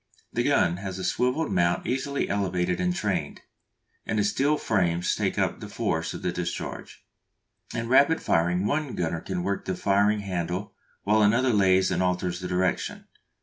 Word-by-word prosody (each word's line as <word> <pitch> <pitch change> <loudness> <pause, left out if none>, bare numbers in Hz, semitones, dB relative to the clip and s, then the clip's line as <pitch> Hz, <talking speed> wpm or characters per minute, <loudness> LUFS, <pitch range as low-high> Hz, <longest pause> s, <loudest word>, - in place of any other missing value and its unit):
The - - +1
gun 85 +1 +2
has 95 -1 -5
a 95 - -5
swivelled 125 - 0
mount 85 0 +1
easily 135 +2 -1
elevated 90 -3 -1
and 90 -1 0
trained, - - -2 0.6
and 110 - -2
the 105 - +3
steel 135 +9 +2
frames 90 -7 +1
take - - -1
up - - 0
the - - -8
force - - -2
of - - -8
the - - 0
discharge. - - -5 0.7
In 115 0 -2
rapid 140 +6 +5
firing 90 +3 +1
one 145 +1 -1
gunner 80 -1 -2
can 90 -2 -3
work 100 +1 -2
the 95 - -2
firing 100 +2 +2
handle 90 0 -3 0.3
while 105 +2 +3
another 115 +4 +3
lays 95 -2 +4
and 90 0 0
alters 90 -1 0
the 90 - -5
direction. 90 0 -1
95 Hz, 170 wpm, -26 LUFS, 90-110 Hz, 0.7 s, rapid